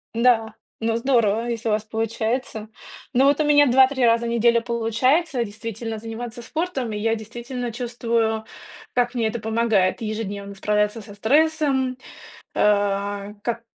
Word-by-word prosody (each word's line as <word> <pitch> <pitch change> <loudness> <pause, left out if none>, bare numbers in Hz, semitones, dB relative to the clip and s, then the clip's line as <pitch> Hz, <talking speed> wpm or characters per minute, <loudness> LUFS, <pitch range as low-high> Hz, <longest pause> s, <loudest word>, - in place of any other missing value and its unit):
Да, 230 -2 +3 0.2
ну, 225 0 0
здорово, 235 -3 +2
если 230 -1 -2
у - - +2
вас 210 0 0
получается. 225 0 -3 0.4
Ну 260 +2 +4
вот 285 +2 +4
у - - +3
меня 290 -1 +5
2-3 260 +1 +4
раза 230 0 +3
в 235 - -2
неделю 235 0 +3
получается 245 +5 +1
действительно 225 +1 -6
заниматься 230 +2 -6
спортом. 275 -5 -3
И - - -3
я 225 +2 +1
действительно 240 +2 -6
чувствую, 230 -2 -1 0.5
как 245 0 +1
мне 230 -3 0
это 235 +2 -3
помогает 220 -3 +1
ежедневно 205 -2 -4
справляться 210 +2 0
со 205 0 -12
стрессом, 270 +2 +2 0.6
э, 205 0 +1
как 235 -1 -2
230 Hz, 145 wpm, -23 LUFS, 220-245 Hz, 0.6 s, меня